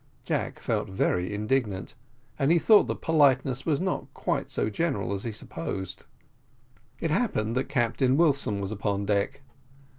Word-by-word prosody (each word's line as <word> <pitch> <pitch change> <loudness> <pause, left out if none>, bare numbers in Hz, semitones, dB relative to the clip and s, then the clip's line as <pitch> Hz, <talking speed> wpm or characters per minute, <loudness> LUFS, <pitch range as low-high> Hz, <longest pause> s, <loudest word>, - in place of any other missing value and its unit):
Jack - - -2
felt - - -1
very 90 -1 0
indignant, 105 -2 -1 0.5
and 140 +3 +3
he 170 - +6
thought 210 +5 +6
that - - -4
politeness 140 -4 +3
was 150 -3 +2
not 185 0 -2
quite - - -1
so - - -1
general 105 - -1
as 100 +2 -4
he 115 - -2
supposed. 95 -2 -5 0.9
It - - -1
happened 110 +2 0
that 130 - -1
Captain 130 +1 +2
Wilson 140 -10 +2
was 100 0 -3
upon 100 -1 -1
deck. 105 +7 -1
115 Hz, 150 wpm, -27 LUFS, 100-140 Hz, 0.9 s, he